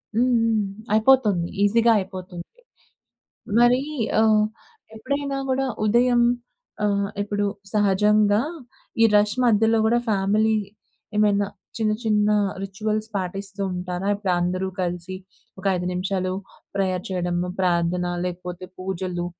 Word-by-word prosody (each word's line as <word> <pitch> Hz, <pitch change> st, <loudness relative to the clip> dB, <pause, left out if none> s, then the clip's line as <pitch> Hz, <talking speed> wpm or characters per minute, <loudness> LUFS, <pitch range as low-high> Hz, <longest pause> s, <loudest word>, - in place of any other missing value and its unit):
హ్మ్. 250 Hz, +3 st, +3 dB
హ్మ్. 225 Hz, -2 st, +2 dB, 0.3 s
అయిపోతోంది. 215 Hz, -6 st, +3 dB
ఈజీగా 230 Hz, +3 st, +4 dB
అయిపోతుంది. 185 Hz, -2 st, -7 dB, 1.1 s
మరీ 240 Hz, +1 st, +5 dB, 0.4 s
ఆహ్, 215 Hz, -1 st, +4 dB, 0.5 s
ఎప్పుడైనా 280 Hz, +5 st, -3 dB
గూడా 265 Hz, +1 st, +1 dB, 0.2 s
ఉదయం 240 Hz, +3 st, +3 dB, 0.6 s
ఆహ్, 200 Hz, -1 st, +1 dB
ఇప్పుడు 205 Hz, 0 st, -2 dB, 0.3 s
సహజంగా 210 Hz, +1 st, +3 dB, 0.6 s
ఈ -, -, +8 dB
రష్ 205 Hz, +1 st, +2 dB
మధ్యలో 225 Hz, -1 st, +4 dB
గూడా 235 Hz, +2 st, +3 dB
ఫ్యామిలీ 210 Hz, +2 st, +2 dB, 0.6 s
ఏమైనా 205 Hz, -1 st, +3 dB, 0.3 s
చిన్న, 215 Hz, -1 st, +1 dB
చిన్న 210 Hz, -1 st, +2 dB, 0.3 s
రిచ్యువల్స్ 215 Hz, +2 st, -3 dB
పాటిస్తూ 195 Hz, +1 st, -4 dB
ఉంటారా? 180 Hz, +1 st, -4 dB
ఇప్పుడందరూ 185 Hz, -1 st, -1 dB
కలిసి 180 Hz, +1 st, -3 dB, 0.4 s
ఒక 190 Hz, -, -11 dB
5 180 Hz, 0 st, -3 dB
నిమిషాలు 185 Hz, 0 st, -1 dB, 0.4 s
ప్రేయర్ 185 Hz, -2 st, -1 dB
చెయడము. 175 Hz, -1 st, -1 dB
ప్రార్థన, 180 Hz, 0 st, +1 dB, 0.2 s
లేకపోతే 180 Hz, 0 st, -5 dB
పూజలు 185 Hz, -1 st, -3 dB
200 Hz, 105 wpm, -23 LUFS, 185-220 Hz, 1.1 s, ఈ